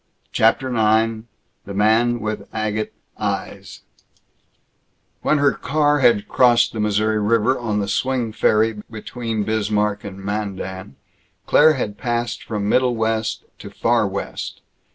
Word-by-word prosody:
CHAPTER 115 +4 +2
IX 110 0 +2 0.4
THE 100 - -7
MAN 115 +3 +2
WITH 110 0 -4
AGATE 110 -1 -2 0.3
EYES - - -4 1.4
When 155 - +2
her 140 -1 +4
car 145 +2 +1
had 115 -6 +3
crossed 120 0 +4
the 110 - -5
Missouri 105 +1 +1
River 115 +4 +2
on 110 -3 -1
the 100 - -2
swing 125 -1 -1
ferry 110 0 +2
between 115 0 -4
Bismarck 105 -1 0
and 95 -2 -8
Mandan, 95 -5 -5 0.5
Claire 155 +1 +5
had 105 -7 -4
passed 120 -1 -2
from 105 -2 -3
Middle 125 +2 +2
West 110 0 -1 0.2
to - - -9
Far - - +1
West. - - -5
110 Hz, 130 wpm, -21 LUFS, 105-120 Hz, 1.4 s, Claire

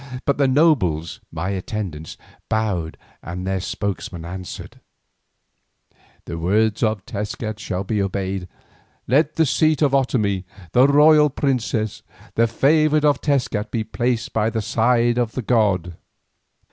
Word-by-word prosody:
But 140 - +1
the 140 - +4
nobles, 130 - +2
my 85 +4 -3
attendants, 95 -5 -5 0.3
bowed, 100 -8 -1 0.2
and 90 +2 -6
their 95 0 -1
spokesman 95 -3 -4
answered: 90 +1 -8 1.5
"The 85 - -5
words 105 +5 +1
of 110 -4 0
Tezcat 105 +1 -5
shall 95 -2 -3
be 105 +1 -1
obeyed. 95 -1 -3 0.6
Let 145 +5 +2
the 165 - +3
seat 155 +2 +2
of 140 - +3
Otomie, 105 -8 +1 0.3
the 125 +2 +5
royal 150 +1 +6
princess, 120 -6 -1 0.3
the 115 +1 +3
favoured 155 +5 +3
of 145 -3 +3
Tezcat, 125 -7 0
be 115 -2 -2
placed 120 +1 -2
by 110 0 +1
the 110 -1 -3
side 120 +2 +2
of 120 -2 -1
the 130 - -3
god." 100 -7 +1
110 Hz, 135 wpm, -21 LUFS, 95-130 Hz, 1.5 s, royal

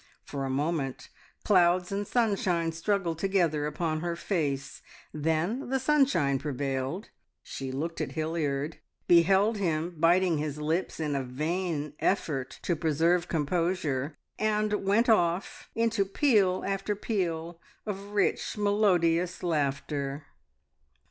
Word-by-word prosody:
For 140 -1 -4
a - - -3
moment 140 -1 -2 0.3
clouds 180 -2 +3
and 200 +1 -2
sunshine 190 -8 +1
struggled 170 -1 -1
together 170 -6 +1
upon 155 +1 -2
her 170 +1 -2
face, 145 -7 -2 0.3
then 160 - -1
the 265 0 +1
sunshine 265 - +2
prevailed, 135 - -3 0.3
she 135 -1 -6
looked 160 +5 -3
at - - -3
Hilliard, 155 -2 -2 0.3
beheld 190 +6 +5
him 170 -2 -1
biting 170 0 +4
his 150 -1 -3
lips 160 +5 -1
in 150 -2 -1
a 135 - -1
vain 150 +3 -2
effort 150 -9 -1
to 175 - +1
preserve 165 +3 +2
composure, 160 -3 -1 0.2
and 215 0 +1
went 205 +5 +3
off 180 -5 +1
into 230 -2 +2
peal 195 -3 +2
after 195 +1 -1
peal 170 -5 -3 0.2
of 200 -1 -5
rich, 205 +1 0
melodious 180 -5 +2
laughter. 145 -2 -1
170 Hz, 120 wpm, -28 LUFS, 150-195 Hz, 0.3 s, beheld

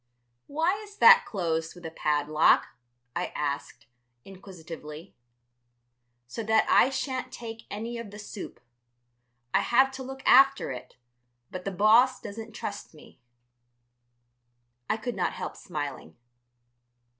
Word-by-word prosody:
"Why 330 +7 0
is 410 -1 -14
that 480 +1 +8
closed 165 -5 -2
with 175 -1 -13
a 160 - -5
padlock?" 150 0 +2 0.5
I - - -1
asked, 145 -1 -4 0.4
inquisitively. 170 -4 -10 1.1
"So 120 - -6
that 220 0 +3
I - - +5
shan't 265 -1 -3
take 225 -1 -9
any 230 +3 -5
of 230 -3 -7
the 205 - -11
soup. 205 - -8 0.9
I - - +5
have 265 +2 +3
to 265 0 -8
look 265 +1 -8
after 270 - +5
it, 125 - -9 0.6
but 185 0 -7
the 195 - -2
boss 225 +6 +4
doesn't 220 +1 -8
trust 200 -5 -7
me." 150 - -17 1.7
I 215 - +1
could 240 +2 -5
not 180 -2 -1
help - - -6
smiling. 145 - -6
210 Hz, 125 wpm, -27 LUFS, 165-255 Hz, 1.7 s, that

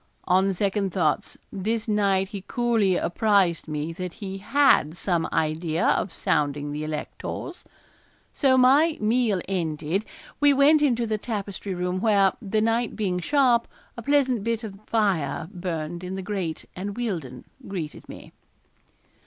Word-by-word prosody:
On 190 +2 +3
second 195 0 0
thoughts 160 -5 0 0.2
this 215 +3 -2
night 200 -3 +2
he 200 -2 -7
coolly 230 -6 +2
apprised 190 -4 +2
me 155 +1 -3
that 180 0 -5
he 195 -2 -6
had 205 - +3
some 170 -2 0
idea 160 +1 0
of 190 - +1
sounding 145 -2 -1
the 150 +1 -4
electors. 155 - -6 0.7
So, 265 -3 +3
my 285 +6 +5
meal 220 -3 +1
ended, 165 0 -1 0.4
we 290 -1 +5
went 290 +3 +5
into 240 -5 +2
the 215 -1 -2
tapestry 200 -3 -4
room 180 +1 -2
where, 200 -3 +4
the 215 0 0
night 230 +1 0
being 185 -4 -1
sharp, 245 - +3 0.3
a 235 - -7
pleasant 260 -4 +2
bit 230 0 -1
of 195 -3 -8
fire 190 -8 0
burned 175 -2 -4
in 180 +1 -4
the 190 - -5
grate, 185 -5 -3
and 200 +3 -5
Wealdon 165 - -4 0.2
greeted 170 -6 -6
me. - - -11
195 Hz, 145 wpm, -25 LUFS, 175-230 Hz, 0.7 s, my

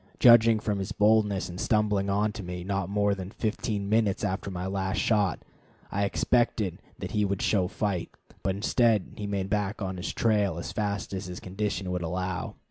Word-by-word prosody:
Judging 115 -2 +7
from 105 -2 -1
his 95 +2 -4
boldness 105 -2 +3
in 90 0 -8
stumbling 105 -2 +1
on 105 +2 +1
to 105 - -7
me, 90 -1 -5
not 95 -1 -2
more 100 0 +2
than 95 -2 -5
fifteen 105 -2 -2
minutes 105 -2 +2
after 100 0 -2
my 90 -1 -4
last 95 +1 -1
shot, 105 -6 +1 0.5
I 100 +1 +1
expected 105 -1 +1 0.2
that - - -6
he 105 - +1
would 100 -1 -1
show 95 -4 +2
fight, 95 -3 -2 0.3
but 95 - 0
instead 110 0 +2
he 105 - -4
made 100 -1 -2
back 105 0 0
on 95 -3 -3
his 90 - -3
trail 105 -6 +1
as 85 - -5
fast 100 -2 -2
as 95 0 -4
his 90 0 -6
condition 95 -1 -3
would 90 -1 -1
allow. 90 +2 -3
100 Hz, 190 wpm, -28 LUFS, 95-105 Hz, 0.5 s, Judging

